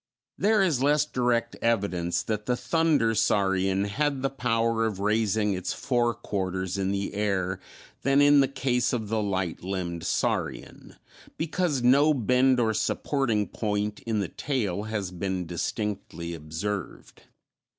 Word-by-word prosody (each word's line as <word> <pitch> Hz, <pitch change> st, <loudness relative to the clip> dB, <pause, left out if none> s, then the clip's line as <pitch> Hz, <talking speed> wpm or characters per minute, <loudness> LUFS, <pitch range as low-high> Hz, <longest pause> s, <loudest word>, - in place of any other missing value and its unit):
There 210 Hz, -1 st, +3 dB
is 155 Hz, -9 st, +1 dB
less 145 Hz, +1 st, +3 dB
direct 120 Hz, -4 st, 0 dB
evidence 100 Hz, -7 st, 0 dB
that 105 Hz, -1 st, -3 dB
the 125 Hz, -1 st, +1 dB
"thunder 145 Hz, -3 st, +2 dB
saurian" 95 Hz, -2 st, +2 dB
had 135 Hz, +6 st, -1 dB
the 135 Hz, -, 0 dB
power 115 Hz, -3 st, 0 dB
of 105 Hz, -4 st, -4 dB
raising 105 Hz, 0 st, +1 dB
its 90 Hz, -1 st, -3 dB
fore 120 Hz, -2 st, 0 dB
quarters 95 Hz, -2 st, -3 dB
in 95 Hz, -1 st, -1 dB
the 100 Hz, 0 st, -2 dB
air 95 Hz, -3 st, -1 dB, 0.4 s
than 135 Hz, +1 st, +3 dB
in 145 Hz, 0 st, +6 dB
the 135 Hz, -, +4 dB
case 125 Hz, -2 st, 0 dB
of 110 Hz, -4 st, -2 dB
the 110 Hz, 0 st, 0 dB
"light 95 Hz, -5 st, -2 dB
limbed 90 Hz, -3 st, -3 dB
saurian," -, -, -2 dB, 0.4 s
because 160 Hz, -4 st, -1 dB
no 140 Hz, +5 st, +5 dB
bend 125 Hz, +1 st, +3 dB
or 110 Hz, -2 st, +2 dB
supporting 115 Hz, -3 st, 0 dB
point 105 Hz, -1 st, -2 dB
in 110 Hz, -2 st, -2 dB
the 100 Hz, -, -2 dB
tail 105 Hz, -, -2 dB
has 105 Hz, -4 st, -3 dB
been 90 Hz, 0 st, -3 dB
distinctly 85 Hz, -1 st, -4 dB
observed. 85 Hz, +5 st, -5 dB
110 Hz, 140 wpm, -27 LUFS, 95-125 Hz, 0.4 s, in